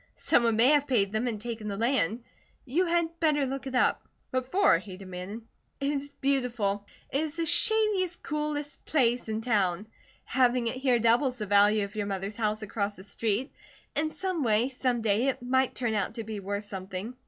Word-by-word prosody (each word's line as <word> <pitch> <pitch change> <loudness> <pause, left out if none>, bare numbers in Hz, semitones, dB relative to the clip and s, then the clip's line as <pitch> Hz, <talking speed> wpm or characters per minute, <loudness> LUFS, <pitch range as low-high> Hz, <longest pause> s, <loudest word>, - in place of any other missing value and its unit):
"Someone 230 -2 +2
may 235 +4 +5
have 290 -1 +4
paid 200 -7 +2
them 220 +3 -1
and 220 -3 -2
taken 225 -1 -5
the 200 -1 -3
land. 235 -1 +1 0.4
You 330 +8 +1
had 335 -1 0
better 300 -4 +2
look 270 0 -4
it 260 - -4
up." 250 - +2 0.2
"What 255 0 0
for?" 360 - +4
he 190 0 -10
demanded. 190 +3 -7 0.4
"It 280 +1 0
is 285 0 -4
beautiful. 240 -7 0 0.2
It 275 - +1
is 315 -1 -3
the 335 -1 -1
shadiest, 420 -3 +2
coolest 295 -1 -3
place 245 -5 +1
in 220 0 -2
town. 205 -5 +1 0.4
Having 250 -1 +2
it 255 - -5
here 255 -2 +3
doubles 235 +3 +3
the 215 -4 -4
value 205 +1 +4
of 200 +2 -12
your 205 -1 -2
mother's 195 +1 -3
house 215 -1 -1
across 205 -1 -2
the 185 - -11
street. 220 +5 -1 0.4
In 310 +1 +1
some 370 0 -3
way, 225 +2 +2
some 250 -2 -1
day, 220 +3 +2
it 270 - 0
might 260 +1 +1
turn 240 -3 -1
out 205 +1 -1
to 230 - -4
be 215 -1 -5
worth 200 +1 -3
something." 195 +3 -6
240 Hz, 195 wpm, -28 LUFS, 210-275 Hz, 0.4 s, may